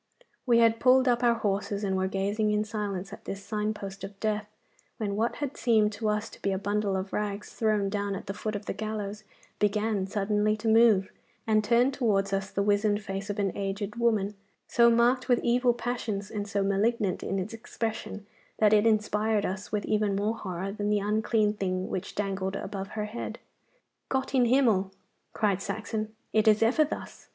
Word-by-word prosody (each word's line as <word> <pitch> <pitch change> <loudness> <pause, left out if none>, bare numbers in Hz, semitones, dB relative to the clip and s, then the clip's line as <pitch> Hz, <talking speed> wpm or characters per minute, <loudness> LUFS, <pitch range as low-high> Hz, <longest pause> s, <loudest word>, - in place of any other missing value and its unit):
We 235 -1 +5
had 230 -1 +4
pulled 255 +1 +5
up 240 -1 +3
our 235 -1 +4
horses, 200 -1 -1
and 190 -1 0
were 190 0 +1
gazing 200 +3 0
in 210 0 +2
silence 205 -3 -4
at - - -11
this 195 0 -6
sign 210 +1 -1
post 195 -2 -7
of 195 0 -8
death, 215 -1 -1 0.5
when 205 -2 -2
what 225 +3 0
had 290 -2 -4
seemed 220 -3 +3
to 215 +1 -2
us 210 +1 -1
to - - -14
be 200 - 0
a 190 - 0
bundle 205 0 0
of 190 +1 -5
rags 205 -1 -3
thrown 215 -3 +1
down 200 0 -2
at - - -7
the 195 - -4
foot 215 +1 -4
of 205 - -5
the - - -2
gallows 215 -1 -4 0.4
began 210 -1 +1
suddenly 210 +1 +1
to 220 +2 -4
move, 220 -4 +5 0.3
and 215 -1 +3
turned 240 +5 +3
towards 200 -7 +1
us 195 0 -1
the 200 - -1
wizened 205 +1 +2
face 195 +1 -5
of 205 - -3
an 200 -3 -1
aged 200 +2 -3
woman, 220 -4 +1 0.3
so 235 -1 +5
marked 245 +2 +3
with 245 - +5
evil 245 +1 +3
passions 235 -4 -3
and 205 -1 -3
so 200 -1 0
malignant 200 0 +1
in 195 - -2
its 190 +4 -3
expression 220 -2 -5 0.3
that 215 -1 +4
it 210 +1 +5
inspired 215 -1 +1
us 190 +2 -4
with 210 -2 -1
even 210 -2 +1
more 205 +3 0
horror 190 -2 -4
than 205 0 -2
the 210 - +3
unclean 210 +1 +1
thing 185 -2 -2
which 185 - -4
dangled 195 -1 -2
above 195 -1 -5
her 210 - -1
head. 210 +3 -5 0.7
'Gott 265 0 -1
in 255 -2 +4
Himmel!' 230 -7 +3 0.4
cried 200 -3 +1
Saxon, 215 +2 -4 0.2
'it 220 0 +3
is 215 +1 +5
ever 250 +7 +4
thus! 300 - -7
210 Hz, 195 wpm, -28 LUFS, 200-225 Hz, 0.7 s, We